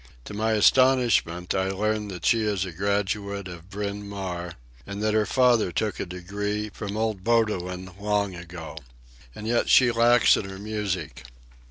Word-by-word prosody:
To - - -8
my 110 +2 0
astonishment 115 -7 +3
I 95 0 0
learn 105 +2 -1
that 90 -4 -7
she 115 - +4
is 105 -3 0
a 90 - -6
graduate 100 +1 -2
of 90 0 -10
Bryn 100 0 -5
Mawr, 90 -4 -5 0.3
and 100 0 -6
that 110 0 +1
her 110 -1 +2
father 125 -7 +3
took 105 +6 -2
a - - -3
degree 105 +4 -4
from 105 0 -6
old 110 -4 -1
Bowdoin 95 -5 0
long 100 -1 0
ago. 85 -3 -9 0.6
And 105 - -8
yet 120 +1 +1
she 125 -2 +6
lacks 120 +1 +5
in 95 - -4
her 95 - -8
music. 100 -9 -4
100 Hz, 165 wpm, -25 LUFS, 95-110 Hz, 0.6 s, she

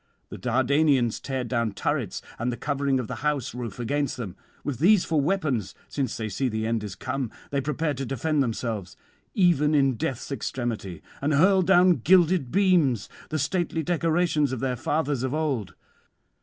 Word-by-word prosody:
The - - -8
Dardanians 130 0 +2
tear 130 -2 -3
down 115 -3 -1
turrets - - -2 0.2
and 120 +2 0
the 120 - -5
covering 140 0 0
of 125 - -3
the - - -5
house 150 -4 -1
roof 120 -3 -6
against 140 +3 -1
them; 100 -8 -6 0.3
with 140 -5 -3
these 190 +4 +5
for 160 -3 +1
weapons, 140 - -1
since 135 -4 -2
they 110 - -3
see 125 +6 -1
the 110 -1 -2
end 115 -1 -1
is 100 -2 -6
come, 130 +4 -3 0.2
they 140 -1 0
prepare 150 +2 -1
to 135 0 -4
defend 140 +4 0
themselves 110 -6 -3 0.4
even 155 -5 +3
in 135 -4 +3
death's 125 +5 -3
extremity: 115 - -4 0.2
and 145 +1 +1
hurl 190 +5 +5
down 180 -1 +5
gilded 175 0 +4
beams, 170 - +3 0.2
the 155 - -1
stately 165 +2 -1
decorations 165 -3 +1
of 130 - -3
their 130 0 -1
fathers 145 +1 -1
of 130 +2 -1
old. 130 - -2
135 Hz, 170 wpm, -26 LUFS, 120-155 Hz, 0.4 s, these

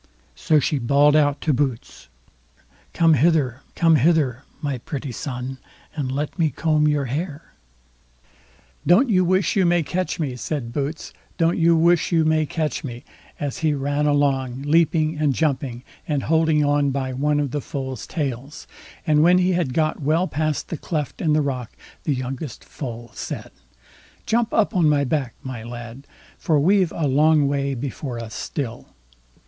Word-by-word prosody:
So 155 -2 +2
she 145 +1 0
bawled 140 +4 +4
out 145 -2 +2
to 155 - +1
Boots: 130 -3 -3 0.8
"Come 165 -1 +4
hither, 145 -3 +2
come 165 -2 +4
hither, 145 -4 +2 0.2
my 140 -4 -3
pretty 140 +2 -5
son, 130 +1 -5 0.4
and 140 -4 -2
let 145 +6 -3
me 160 -2 +3
comb 155 +2 +1
your 145 -2 +1
hair." 150 +4 -5 1.3
"Don't 225 +9 +5
you 185 -2 +4
wish 185 +2 +1
you 195 - +3
may 175 -1 +3
catch 180 +4 -2
me", 140 -6 -2
said 125 -2 -4
Boots. 145 +3 -4 0.2
"Don't 165 +1 +2
you 170 0 +5
wish 170 +2 +3
you 165 -2 +3
may 155 -1 +2
catch 155 -1 -2
me", 120 -3 -7 0.4
as 145 -2 -3
he 155 -2 +1
ran 145 +2 0
along, 135 -3 +1
leaping 155 0 +2
and 145 -4 +2
jumping, 130 -5 -1 0.2
and 145 -3 -1
holding 160 -1 +2
on 145 0 +2
by 130 -1 -2
one 145 +3 +1
of 145 -3 -1
the 145 - -2
foal's 130 -3 -5
tails. 140 -1 -4 0.4
And 150 -1 +4
when 175 +3 +6
he 180 0 +2
had 175 -7 0
got 155 +3 0
well 160 +6 +2
past 155 -2 -2
the 165 - -3
cleft 150 -3 -4
in 155 -2 +2
the 155 0 +3
rock, 130 -4 -4 0.3
the 145 - +1
youngest 130 +1 -5
foal 120 -4 -7
said: - - -6 0.7
"Jump 235 0 +1
up 215 -1 +1
on 170 -4 +4
my 145 -1 +3
back, 135 -3 -1
my 130 -4 -6
lad, 120 +3 -9 0.3
for 155 -4 +2
we've 185 +2 +3
a 155 -3 -1
long 150 +2 +4
way 140 -1 -1
before 130 0 -5
us 115 -2 -7
still." 120 +4 -5
145 Hz, 165 wpm, -22 LUFS, 135-160 Hz, 1.3 s, when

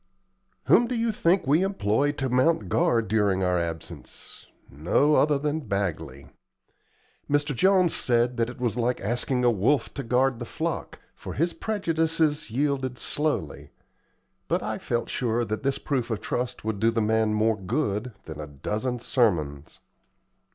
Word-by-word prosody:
Whom 240 - +5
do 250 - -2
you 230 0 +1
think 185 -2 +2
we 150 +6 +3
employed 145 - 0
to 135 - -1
mount 130 +7 +2
guard 120 -10 +2
during 100 -3 +1
our 90 -1 +2
absence? 85 -2 -7 0.2
No 85 - +1
other 150 -1 +4
than 150 +2 -1
Bagley. 80 -9 -3 1.0
Mr. 145 0 +1
Jones 185 +3 +4
said 120 0 +2
that 115 0 +1
it 125 - -10
was 120 -4 -1
like 125 +1 0
asking 120 +4 -1
a 120 - +5
wolf 120 +7 +1
to 140 - -4
guard 125 0 +1
the 120 - -5
flock, 165 +6 -4 0.2
for - - -8
his 170 +4 0
prejudices 160 - 0
yielded 130 0 -1
slowly; 145 - -2 0.8
but - - 0
I - - -3
felt 120 -1 -2
sure 120 -1 -1
that 110 0 -3
this 135 0 0
proof 130 -5 -2
of 110 -3 -2
trust 125 +1 -3
would 110 -2 -2
do 115 - +3
the 115 0 0
man 110 0 +1
more 110 +1 +2
good 105 +2 -2
than 80 -2 -8
a 75 - -7
dozen 105 - -3
sermons. 80 - -1
125 Hz, 160 wpm, -26 LUFS, 105-145 Hz, 1.0 s, Whom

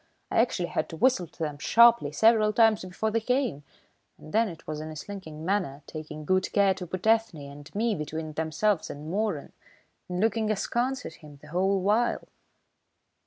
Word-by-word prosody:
I - - +2
actually 180 -7 -1
had 155 - -2
to 165 - -8
whistle 250 -5 +2
to 165 - -26
them 150 -2 -4
sharply 230 -1 +5
several 215 +4 +4
times 225 -2 +4
before 185 +4 -2
they 230 - +1
came, 250 - -1 0.5
and 155 - -13
then 225 0 +3
it 165 -2 -11
was 155 -1 -5
in 155 - -6
a 155 - -8
slinking 160 -2 -8
manner, 175 -8 -1
taking 155 -1 -8
good 185 +3 +1
care 200 -2 +4
to 185 -1 -8
put 185 +3 -5
Ethne 225 -5 +3
and 145 +3 -11
me 225 +2 +1
between 155 -1 -5
themselves 160 +5 0
and 150 +3 -7
Moeran, 200 -6 -2 0.6
and 180 0 -3
looking 220 +1 +1
askance 240 +5 -1
at 160 - -8
him 150 -2 -13
the 150 - -13
whole 190 +3 +1
while." 215 +5 +1
185 Hz, 185 wpm, -27 LUFS, 155-220 Hz, 0.6 s, sharply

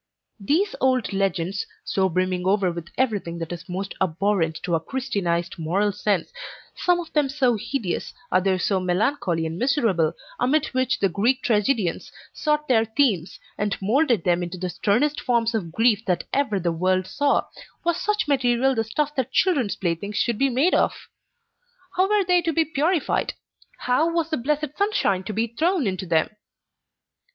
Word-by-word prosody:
These 330 - +1
old 255 -5 +1
legends, 195 -1 -1 0.2
so 190 -1 +1
brimming 185 +1 -1
over 195 -2 +2
with 170 -1 -7
everything 205 -9 -1
that 165 0 -5
is 175 0 -7
most 190 +2 -4
abhorrent 175 -2 +1
to 180 -2 -2
our 165 - +3
Christianized 175 -6 -2
moral 190 +6 +1
sense 205 - -1 0.4
some 355 -1 +2
of 335 -2 -8
them 295 -3 +2
so 265 -4 +2
hideous, 215 -3 -3 0.2
others 185 0 +2
so 195 -2 +1
melancholy 180 - 0
and 160 +2 -4
miserable, 225 - +2 0.3
amid 280 +4 +2
which 255 0 +1
the 195 - +2
Greek 230 +9 +1
tragedians 210 -4 0 0.2
sought 300 -1 0
their 225 -4 +4
themes, 220 - 0 0.2
and 205 -1 -1
moulded 235 - +2
them 175 -1 +2
into 175 +1 -5
the 180 0 -3
sternest 250 - +1
forms 235 -2 +1
of 185 -7 -2
grief 225 +3 +2
that 180 -2 +1
ever 265 -8 +1
the 170 -1 0
world 185 +2 +1
saw; 280 +8 +1 0.4
was 345 -1 0
such 420 -4 0
material 260 -1 +2
the 225 -3 0
stuff 295 +7 -2
that 260 -2 -1
children's 280 - +2
playthings 190 +3 -3
should 235 -3 0
be 275 - +3
made 270 +9 +2
of! - - +2 1.0
How 375 +2 +2
were 420 -1 +3
they 360 0 +3
to 330 - 0
be 325 +1 +2
purified? 320 +2 0 0.4
How 280 +7 +1
was 335 -1 -1
the 315 - +1
blessed 295 +3 -2
sunshine 400 - +1
to 215 - -4
be 220 +3 +1
thrown 315 - 0
into 190 -1 -2
them? 160 -1 +2
220 Hz, 170 wpm, -24 LUFS, 185-280 Hz, 1.0 s, their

